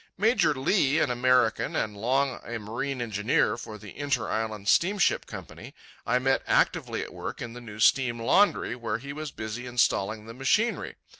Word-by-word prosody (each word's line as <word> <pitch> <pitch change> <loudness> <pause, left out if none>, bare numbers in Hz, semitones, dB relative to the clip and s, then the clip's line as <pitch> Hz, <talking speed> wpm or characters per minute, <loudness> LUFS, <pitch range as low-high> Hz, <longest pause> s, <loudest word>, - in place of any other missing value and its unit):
Major 200 -7 +3
Lee, 135 +1 +2
an 140 - +2
American 125 -2 +2
and 105 -1 -1
long 130 +5 0
a 120 - -5
marine 120 +5 -4
engineer 105 0 +1
for 110 -2 -8
the 105 -1 -12
Inter 140 -5 -1
Island 110 -2 -3
Steamship 195 - +2
Company, - - -10 0.3
I 120 +3 +3
met 135 +1 +1
actively - - +1
at - - -10
work - - -6
in 115 -1 -6
the 120 - -9
new 110 -3 -10
steam 120 0 +3
laundry, 135 - +3
where 115 -3 -3
he 140 +4 -8
was 155 +1 -5
busy 110 +1 -6
installing 110 -3 0
the 115 - -9
machinery. 145 - 0
125 Hz, 170 wpm, -27 LUFS, 110-140 Hz, 0.3 s, Major